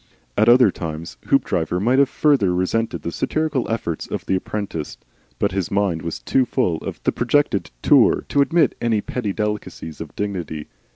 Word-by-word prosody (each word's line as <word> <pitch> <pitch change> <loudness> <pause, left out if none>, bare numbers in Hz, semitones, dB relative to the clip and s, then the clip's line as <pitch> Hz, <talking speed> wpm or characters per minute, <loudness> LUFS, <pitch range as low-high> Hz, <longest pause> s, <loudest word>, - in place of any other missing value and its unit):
At 110 +2 +4
other 120 -4 +6
times 80 -1 -6
Hoopdriver 85 +2 +1
might 125 +7 +3
have 140 -1 +4
further 130 -15 +2
resented 95 -1 -1
the 85 - -3
satirical 155 - -1
efforts 85 -8 -3
of - - -5
the - - 0
apprentice, 95 -5 -4 0.4
but - - +1
his 95 -2 -2
mind 100 -5 0
was 85 -1 -4
too 135 - +1
full 115 -9 0
of - - -6
the - - +2
projected 120 -4 +1
Tour - - +5
to 140 - +3
admit 155 0 +3
any 115 -3 +1
petty 110 -3 -3
delicacies 105 -7 -4
of 80 - -8
dignity. 90 -7 -4
105 Hz, 170 wpm, -21 LUFS, 85-125 Hz, 0.4 s, other